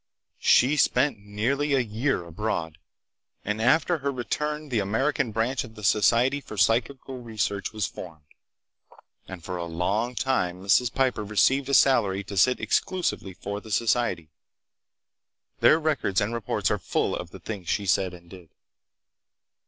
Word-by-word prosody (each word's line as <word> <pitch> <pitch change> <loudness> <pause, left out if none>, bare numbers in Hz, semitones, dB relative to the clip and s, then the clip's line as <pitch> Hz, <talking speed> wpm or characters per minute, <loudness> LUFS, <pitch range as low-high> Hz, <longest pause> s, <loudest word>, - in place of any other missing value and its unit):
She 140 +5 +4
spent 135 -2 +2
nearly 120 +9 -1
a - - +3
year 115 -3 -1
abroad; 85 -3 -4 0.7
and 105 +2 -2
after 155 +7 +3
her 140 0 -1
return 150 +4 -3
the 120 -4 0
American 125 +6 0
branch 115 +5 -1
of 110 -3 -12
the 105 - -11
Society 120 +7 +3
for 110 - -10
Psychical 120 +6 0
Research 110 -3 -3
was 110 -3 -2
formed, 80 -4 -9 1.0
and 95 -3 -9
for 90 +1 -5
a 85 - -4
long 100 +9 -1
time 90 -10 -1
Mrs. 110 +4 +3
Piper 130 -4 0
received 130 +7 +2
a 140 - +3
salary 105 -8 +3
to 100 +1 -8
sit 125 +7 +3
exclusively 175 - -1
for 100 +2 -5
the 110 - -12
society. 110 -7 0 1.3
Their 155 - +5
records 150 -11 0
and 105 +2 -1
reports 115 -3 -1
are - - 0
full - - -1
of - - -6
the - - -11
things 100 -6 -7
she 100 - 0
said 95 -1 +1
and 85 0 -16
did. 90 -2 -13
110 Hz, 150 wpm, -26 LUFS, 95-130 Hz, 1.3 s, Their